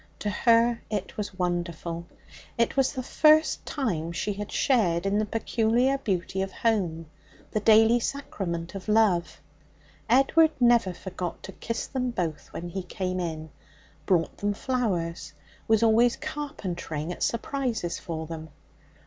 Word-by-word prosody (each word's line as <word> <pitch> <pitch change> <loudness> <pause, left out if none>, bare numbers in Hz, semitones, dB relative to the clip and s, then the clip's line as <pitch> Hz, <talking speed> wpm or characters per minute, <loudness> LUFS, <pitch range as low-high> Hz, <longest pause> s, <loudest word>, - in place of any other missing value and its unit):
To 205 - -2
her 230 +2 +3
it 205 -3 -3
was 205 -3 -5
wonderful. 170 -1 -3 0.5
It 235 0 +1
was 270 -1 +3
the 260 -2 -4
first 310 +4 +4
time 175 - -2
she 170 +5 -2
had 205 +1 -6
shared 195 -10 +2
in 200 +1 +2
the 215 - +1
peculiar 235 +4 +1
beauty 190 -4 -2
of 190 0 -3
home, 185 -8 0 0.5
the 215 - 0
daily 220 +2 +6
sacrament 185 -11 -4
of 195 0 -8
love. 180 -8 +2 0.7
Edward 305 +6 +5
never 235 -5 +4
forgot 185 -2 -6
to 195 - -7
kiss 230 +3 -4
them 255 -2 -2
both 170 -9 -3
when 175 +1 -6
he 190 +3 -4
came 185 0 -3
in; 160 -3 -4 0.6
brought 170 -3 +1
them 205 0 -1
flowers; 190 -12 -2 0.3
was 220 0 +4
always 230 +2 +4
carpentering 190 - -5
at - - -12
surprises 235 -6 -1
for 160 -1 -5
them. 160 0 -7
205 Hz, 140 wpm, -27 LUFS, 175-235 Hz, 0.7 s, daily